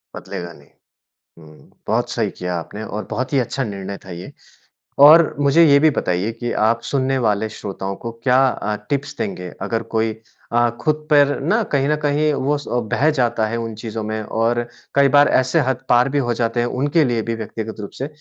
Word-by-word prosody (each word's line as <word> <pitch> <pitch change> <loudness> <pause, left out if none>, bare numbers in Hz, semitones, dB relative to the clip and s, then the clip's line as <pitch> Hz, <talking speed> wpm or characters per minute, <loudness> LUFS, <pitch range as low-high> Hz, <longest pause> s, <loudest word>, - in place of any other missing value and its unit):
बदलेगा 85 -1 -7
नहीं। 70 -2 -19 0.7
हुँ, 80 -1 -17 0.2
बहुत - - 0
सही - - -1
किया 90 0 -4
आपने 105 +6 -7
और 105 0 -5
बहुत 130 +5 -3
ही 140 - +4
अच्छा 130 +2 -2
निर्णय 100 -3 -5
था - - -12
ये 90 +1 -8 0.7
और 160 +2 +7
मुझे 145 +4 +5
ये 140 -2 +6
भी 155 +2 +5
बताइए 95 -4 -1
कि 120 +1 -5 0.2
आप 115 +1 +1
सुनने 135 +1 0
वाले 105 +1 +1
श्रोताओं 100 -2 -6
को 115 +4 -7
क्या 125 -1 +4
अ, 105 -3 -3
टिप्स 140 0 -2
देंगे 90 -3 -4
अगर 115 0 -2
कोई 110 0 +1 0.4
अ, 120 0 +3
खुद 155 +3 -1
पर 145 -1 +4
ना 220 +3 +1
कहीं 140 -1 +2
न 150 - +3
कहीं 150 +1 +2
वो 140 +2 0
स 145 - -10 0.3
बह 150 +4 +3
जाता 120 -3 +1
है 115 +2 -3
उन 115 -1 -4
चीज़ों 110 -1 -4
में 110 0 -3
और 115 +2 -1 0.3
कई 140 0 +5
बार 145 - +6
ऐसे 130 +6 +1
हद 130 - -3
पार 125 +2 +4
भी 145 - -1
हो - - +2
जाते 115 0 -1
हैं, 120 - +1
उनके 145 +6 +1
लिए 120 -3 0
भी 115 +1 -3
व्यक्तिगत 110 0 -6
रूप 100 - -6
से 135 - -2
120 Hz, 205 wpm, -20 LUFS, 110-140 Hz, 0.7 s, और